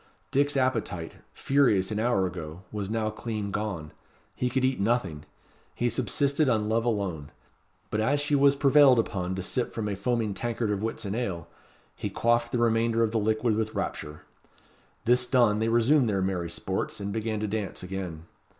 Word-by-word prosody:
Dick's 140 +1 +2
appetite, 115 -10 -1
furious 125 -9 +2
an 105 - -1
hour 110 -4 +2
ago, 85 -1 -6
was 100 -2 -4
now 110 -1 -1
clean 110 -2 -4
gone. 95 -8 -3 0.4
He 125 - 0
could 130 +1 +1
eat 130 -3 0
nothing. 100 -8 0 0.5
He 120 - +1
subsisted 140 +4 +1
on 110 -3 +1
love 115 +2 +1
alone. 95 -11 -2 0.6
But 105 - 0
as 140 +6 +2
she 145 +1 -1
was 140 0 +5
prevailed 140 -2 +6
upon 95 -5 -1
to 95 - -4
sip 125 +6 -2
from 110 -2 -2
a 100 - -2
foaming 110 +1 -1
tankard 115 0 -2
of 100 - -1
Whitsun 110 -2 -3
ale, 100 -8 -3 0.5
he - - -4
quaffed 120 0 +1
the - - 0
remainder 115 0 +2
of 110 - +1
the 115 - +1
liquid 110 +1 +1
with 110 0 -2
rapture. 75 +1 -4 0.8
This 125 +1 +3
done, 120 -5 +3
they 110 +1 +1
resumed 120 +3 +4
their 95 -2 0
merry 90 -3 -2
sports, 95 +4 -3
and 100 0 -4
began 110 -1 -2
to 105 - -2
dance, 105 -3 -3
again. 90 -4 -5
110 Hz, 175 wpm, -27 LUFS, 100-120 Hz, 0.8 s, prevailed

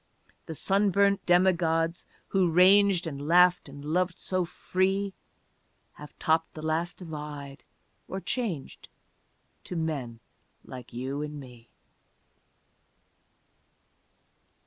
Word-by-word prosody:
The 160 - -6
sunburnt 200 +2 +2
demigods 170 -2 +2 0.2
who 190 -3 +2
ranged 185 +1 +5
And 140 -4 -5
laughed 180 -1 +4
and 140 +1 -10
loved 175 +3 0
so 185 -1 -1
free 190 +3 -1 0.8
Have 150 0 -13
topped 160 +1 0
the 155 - -8
last 165 +2 -1
divide, 150 -4 -8 0.4
or 190 - -4
changed 185 - -4 0.8
To 180 - -6
men 145 -8 -3 0.5
like 125 -1 -10
you 130 +4 -4
and 150 0 -5
me. 125 -4 -13
165 Hz, 100 wpm, -28 LUFS, 150-185 Hz, 0.8 s, ranged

